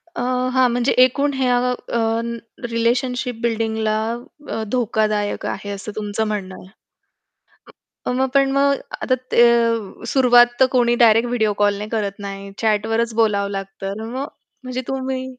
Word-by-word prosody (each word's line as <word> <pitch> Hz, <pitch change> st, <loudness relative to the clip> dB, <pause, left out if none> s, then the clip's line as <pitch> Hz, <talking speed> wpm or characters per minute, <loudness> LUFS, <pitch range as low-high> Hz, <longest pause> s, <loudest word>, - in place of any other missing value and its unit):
अ, -, -, -3 dB, 0.3 s
हां, 260 Hz, -1 st, +4 dB
म्हणजे 245 Hz, +2 st, +1 dB
एकूण 280 Hz, +3 st, 0 dB
ह्या 255 Hz, -2 st, +2 dB
अ, 240 Hz, -1 st, -3 dB, 0.7 s
रिलेशनशिप 245 Hz, +2 st, 0 dB
बिल्डिंगला 220 Hz, -2 st, 0 dB, 0.5 s
अ, 225 Hz, -, -3 dB
धोकादायक 215 Hz, -4 st, 0 dB
आहे 205 Hz, -, -4 dB
असं 200 Hz, +1 st, -6 dB
तुमचं 215 Hz, +1 st, -2 dB
म्हणणं 195 Hz, -3 st, -4 dB
आहे. -, -, -13 dB, 1.4 s
हं, 250 Hz, -, 0 dB
मग 265 Hz, +1 st, +1 dB
पण 275 Hz, -1 st, +4 dB
मग 280 Hz, 0 st, +3 dB, 0.3 s
आता 255 Hz, -, +2 dB, 0.2 s
ते 235 Hz, -, +6 dB
अ, 230 Hz, -3 st, 0 dB
सुरुवात 245 Hz, -2 st, +6 dB
तर 260 Hz, -, +7 dB
कोणी 240 Hz, -2 st, +3 dB
डायरेक्ट 225 Hz, +1 st, +4 dB
व्हिडिओ 220 Hz, -3 st, +1 dB
कॉलने 205 Hz, +1 st, +1 dB
करत 205 Hz, -3 st, -2 dB
नाही. 200 Hz, -1 st, -7 dB
चॅटवरच 225 Hz, +1 st, 0 dB
बोलावं 205 Hz, -3 st, +1 dB
लागतं 195 Hz, 0 st, -5 dB
अन् 225 Hz, +1 st, -6 dB
मग 270 Hz, +2 st, -3 dB, 0.4 s
म्हणजे 255 Hz, 0 st, -4 dB
तुम्ही 265 Hz, -1 st, -3 dB
230 Hz, 145 wpm, -20 LUFS, 210-250 Hz, 1.4 s, तर